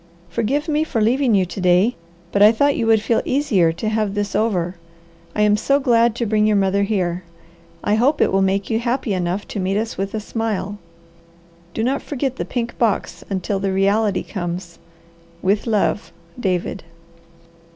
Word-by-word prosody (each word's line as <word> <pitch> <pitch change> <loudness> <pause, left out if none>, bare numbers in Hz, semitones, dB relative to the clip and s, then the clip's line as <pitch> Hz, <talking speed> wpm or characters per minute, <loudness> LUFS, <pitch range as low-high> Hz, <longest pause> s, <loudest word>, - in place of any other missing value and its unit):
Forgive 250 - -1
me 305 0 +1
for 275 -7 -2
leaving 240 +2 +3
you 190 -2 +3
to 185 +2 -7
day, 180 +6 +3 0.4
but 200 - +1
I 210 +1 +9
thought 285 +5 +2
you 230 - -1
would 220 -1 +4
feel 230 - +1
easier 240 - +2
to 215 - -4
have 215 -2 0
this 205 -1 -2
over. 185 -5 0 0.6
I 210 - +2
am 210 0 +4
so 275 +6 +2
glad 235 -4 +3
to 235 - -1
bring 215 0 +2
your 215 - +3
mother 195 0 +2
here. 185 -4 -1 0.6
I 205 - +1
hope 255 +8 +2
it - - +3
will 195 - +2
make 195 +1 +1
you 225 - +1
happy 240 -2 -1
enough 180 +2 -2
to - - -4
meet 190 +1 0
us 220 -1 -3
with 195 +2 -2
a - - -1
smile. 210 -2 -3 1.0
Do 220 - -1
not 265 +4 0
forget 265 -2 -3
the - - -3
pink 240 -1 -4
box 225 -4 0
until 195 0 -2
the 195 0 -1
reality 200 +2 +1
comes. 175 -2 -5 0.6
With 200 +5 +1
love, 210 -1 0 0.3
DAVID. 185 -3 -2
210 Hz, 185 wpm, -20 LUFS, 195-230 Hz, 1.0 s, I